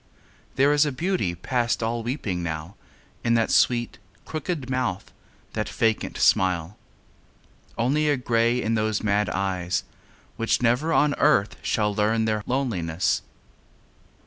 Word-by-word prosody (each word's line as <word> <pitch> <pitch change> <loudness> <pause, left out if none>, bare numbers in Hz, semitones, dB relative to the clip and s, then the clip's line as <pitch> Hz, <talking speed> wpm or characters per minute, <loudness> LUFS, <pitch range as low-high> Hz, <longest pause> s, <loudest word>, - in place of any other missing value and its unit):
There 140 +2 +4
is 145 0 +5
a 150 - 0
beauty 160 - -1
past 120 +6 -1
all 115 +1 -1
weeping 110 -7 -3
now 80 +2 -4 0.5
In 115 0 +2
that 115 -1 +1
sweet, 120 -3 +2 0.3
crooked 155 -3 -4
mouth, 125 -7 -2 0.4
that - - -2
vacant 110 -1 0
smile; 90 0 +2 1.0
Only 140 +6 +1
a 145 - +4
lonely 125 -3 -4
grey 115 +1 +2
in 110 - 0
those 110 -1 0
mad 105 -1 +1
eyes, 90 -1 -1 0.5
Which 115 - +1
never 125 +7 +1
on 150 -2 +3
earth 125 -9 +3
shall 105 -1 0
learn 110 +2 +1
their 110 -1 0
loneliness. 95 -11 0
115 Hz, 135 wpm, -25 LUFS, 100-130 Hz, 1.0 s, is